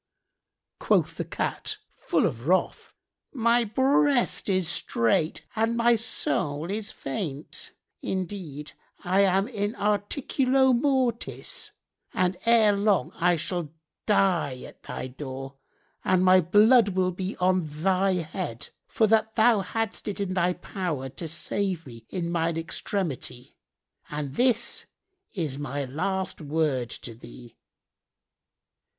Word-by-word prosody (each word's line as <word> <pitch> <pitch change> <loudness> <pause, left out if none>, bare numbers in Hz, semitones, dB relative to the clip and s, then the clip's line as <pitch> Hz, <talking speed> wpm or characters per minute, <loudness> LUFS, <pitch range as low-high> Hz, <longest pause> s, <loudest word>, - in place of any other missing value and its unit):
'" - - -61
Quoth - - +2
the - - -1
Cat, - - -2
full - - 0
of 115 +5 -3
wrath, 185 +2 0 0.4
"My 235 -2 +3
breast 260 +2 +2
is 185 -3 +2
strait 155 0 0
and 225 +1 +1
my 235 0 +4
soul 150 -6 -2
is 210 0 -1
faint: 145 0 -5 0.3
indeed 180 -6 -4 0.3
I 185 +2 +3
am 195 +1 +3
in 210 -3 -3
articulo 255 +6 +2
mortis 255 -2 0 0.4
and 185 0 +1
ere 225 -3 +6
long 200 -1 +2
I 175 +1 +2
shall 170 0 -3 0.4
die 170 - +2
at - - -13
thy - - -6
door 135 +1 -7 0.5
and 185 0 +3
my 185 0 +7
blood 210 +6 +5
will 185 -1 +2
be 185 +2 -4
on 185 0 +3
thy 185 +5 +1
head, 165 -7 -4 0.2
for 220 - +2
that 220 0 +2
thou 225 -1 +5
hadst 225 +3 -3
it 205 - -3
in 195 -2 -1
thy 180 -1 +2
power 175 -7 -4
to 150 +6 -6
save 175 +2 0
me 115 -3 -12
in 170 -2 -3
mine 165 -1 0
extremity: 165 -7 -4 0.5
and 150 -2 -4
this 240 - +2 0.5
is 150 -7 -2
my 145 -1 -3
last 185 +7 -3
word 145 -5 0
to 115 - -7
thee." 120 +1 -13
185 Hz, 125 wpm, -26 LUFS, 150-215 Hz, 0.5 s, my